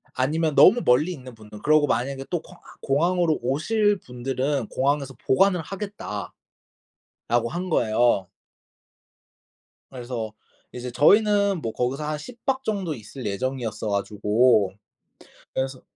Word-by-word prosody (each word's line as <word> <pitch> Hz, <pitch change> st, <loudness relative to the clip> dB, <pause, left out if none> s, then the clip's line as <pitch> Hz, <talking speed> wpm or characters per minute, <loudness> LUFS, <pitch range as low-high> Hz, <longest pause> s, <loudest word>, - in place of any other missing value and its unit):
아니면 155 Hz, +4 st, 0 dB
너무 240 Hz, +6 st, +7 dB
멀리 150 Hz, +9 st, +3 dB
있는 130 Hz, -7 st, -9 dB
분들은 105 Hz, -1 st, -13 dB
그러고 155 Hz, 0 st, +4 dB
만약에 135 Hz, +2 st, -2 dB
또 175 Hz, -3 st, -1 dB
공아 180 Hz, -, -16 dB, 0.2 s
공항으로 170 Hz, +3 st, +2 dB
오실 205 Hz, -, +1 dB
분들은 130 Hz, 0 st, -2 dB
공항에서 140 Hz, 0 st, 0 dB
보관을 180 Hz, +5 st, +4 dB
하겠다."라고 195 Hz, -, -7 dB, 1.0 s
한 180 Hz, +5 st, -4 dB
거예요. 110 Hz, -, +2 dB, 1.6 s
그래서 120 Hz, -4 st, -5 dB, 0.4 s
이제 125 Hz, 0 st, -6 dB
저희는 200 Hz, -, +4 dB
뭐 115 Hz, -, -4 dB
거기서 130 Hz, +6 st, -2 dB
한 150 Hz, 0 st, -2 dB
10 235 Hz, +10 st, -11 dB
박 265 Hz, -1 st, 0 dB
정도 195 Hz, -, -2 dB
있을 120 Hz, +3 st, -10 dB
예정이었어 110 Hz, 0 st, -3 dB
가지고 105 Hz, +1 st, +2 dB, 0.8 s
그래서 130 Hz, -1 st, -3 dB
135 Hz, 280 characters per minute, -24 LUFS, 120-175 Hz, 1.6 s, 너무